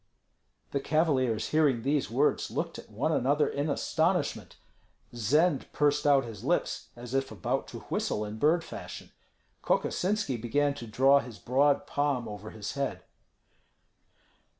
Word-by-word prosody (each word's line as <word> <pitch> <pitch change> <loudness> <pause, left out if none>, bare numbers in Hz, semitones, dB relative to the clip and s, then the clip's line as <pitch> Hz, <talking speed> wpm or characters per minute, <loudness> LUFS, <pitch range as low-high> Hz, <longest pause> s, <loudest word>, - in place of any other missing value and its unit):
The 140 - 0
cavaliers 135 -7 +1
hearing 145 -7 +2
these 140 +1 +1
words - - +1
looked - - -3
at - - -13
one - - -1
another 145 +4 +2
in 145 +2 -2
astonishment. 170 +5 0 0.6
Zend 140 - +1
pursed 145 0 +2
out 140 -3 +5
his 110 -4 -9
lips - - -1
as 120 +1 -9
if 135 0 0
about 100 -5 -2
to - - -8
whistle 105 - -2
in 105 +1 -7
bird 160 +5 +3
fashion. - - -9 0.5
Kokosinski 190 - 0
began 145 +5 +1
to 120 -4 -8
draw 135 +5 +5
his 120 -5 -8
broad 140 +3 +2
palm 145 -4 -1
over 105 0 -7
his 105 -1 -6
head. 140 -1 -3
140 Hz, 140 wpm, -29 LUFS, 120-150 Hz, 0.6 s, out